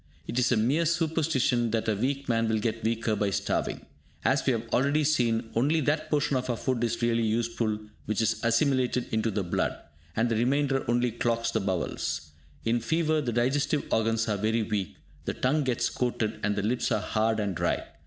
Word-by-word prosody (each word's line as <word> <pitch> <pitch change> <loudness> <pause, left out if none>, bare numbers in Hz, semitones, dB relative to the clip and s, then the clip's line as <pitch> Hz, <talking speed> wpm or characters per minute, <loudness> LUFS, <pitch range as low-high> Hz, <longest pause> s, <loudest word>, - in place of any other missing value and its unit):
It 125 - -2
is 125 - +2
a 120 - +3
mere 140 +10 +2
superstition 160 -7 +1
that 115 0 -1
a 110 - +3
weak 135 +6 -1
man 115 -1 +1
will 110 - +2
get 110 +1 -2
weaker 115 -1 0
by 105 -1 0
starving. 95 - -2 0.4
As 135 +1 +3
we 135 - +2
have 115 0 -3
already 140 +4 +3
seen, 120 -6 +1
only 145 +8 +2
that 155 +2 0
portion 145 -2 +1
of 130 0 -1
our 120 - 0
food 125 -1 -1
is 120 0 -1
really 115 0 +2
useful 115 -1 0 0.3
which 110 - -1
is 110 -1 +1
assimilated 125 +1 +2
into 110 0 +1
the 100 -1 -1
blood, 85 - -1 0.4
and 115 +2 +2
the 115 - 0
remainder 135 +3 +1
only 120 0 +2
clogs 115 0 0
the 110 - +1
bowels. 85 -4 -2 0.3
In 115 +1 +2
fever 155 +5 +1
the 125 -4 -2
digestive 135 +5 +1
organs 115 +1 +1
are 105 -2 0
very 110 +3 +1
weak, 105 -4 -2 0.3
the - - -2
tongue 145 +4 +1
gets 125 -3 0
coated, 115 -3 -1
and 105 0 0
the 100 - -1
lips 120 +4 0
are 110 - +2
hard 110 +1 0
and 100 -2 -1
dry. - - 0
115 Hz, 200 wpm, -28 LUFS, 110-135 Hz, 0.4 s, a